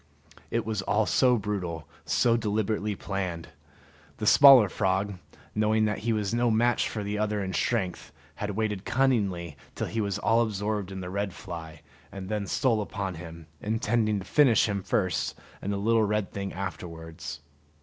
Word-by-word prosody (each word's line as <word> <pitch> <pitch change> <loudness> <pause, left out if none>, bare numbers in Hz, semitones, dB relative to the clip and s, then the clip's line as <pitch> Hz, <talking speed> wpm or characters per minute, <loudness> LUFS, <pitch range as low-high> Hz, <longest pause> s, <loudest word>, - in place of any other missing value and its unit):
It - - -1
was 110 -3 -2
all 105 +3 +1
so 125 +1 +4
brutal, 95 -6 -4 0.2
so 115 -1 +3
deliberately 105 -1 -1
planned! 95 -4 -4 0.7
The 110 - -3
smaller 135 -2 +9
frog, 95 +1 -1 0.3
knowing 110 +1 +2
that 105 0 -1
he 115 +2 -1
was 105 -2 -1
no 120 0 +2
match 120 +2 +2
for 105 - -4
the 105 +1 -3
other 105 -1 0
in 95 0 -4
strength, 95 -6 -1 0.3
had 105 - -3
waited 105 -1 -2
cunningly 105 - 0 0.2
till - - -2
he 115 - -2
was 100 -1 -1
all 115 +3 +3
absorbed 105 -2 -2
in 95 0 -5
the 90 0 -6
red 100 -2 -2
fly, 80 -3 -8 0.3
and 95 -1 -7
then 105 -2 -2
stole 115 -3 +1
upon 100 -2 -4
him, 85 -1 -9 0.2
intending 110 0 +1
to 95 - -6
finish 130 -9 +4
him 100 -2 -2
first 95 0 -1 0.2
and 100 - -2
the 100 - -1
little 115 +3 +3
red 105 -1 0
thing 100 -1 -4
afterwards. 80 -4 -6
105 Hz, 170 wpm, -27 LUFS, 95-110 Hz, 0.7 s, smaller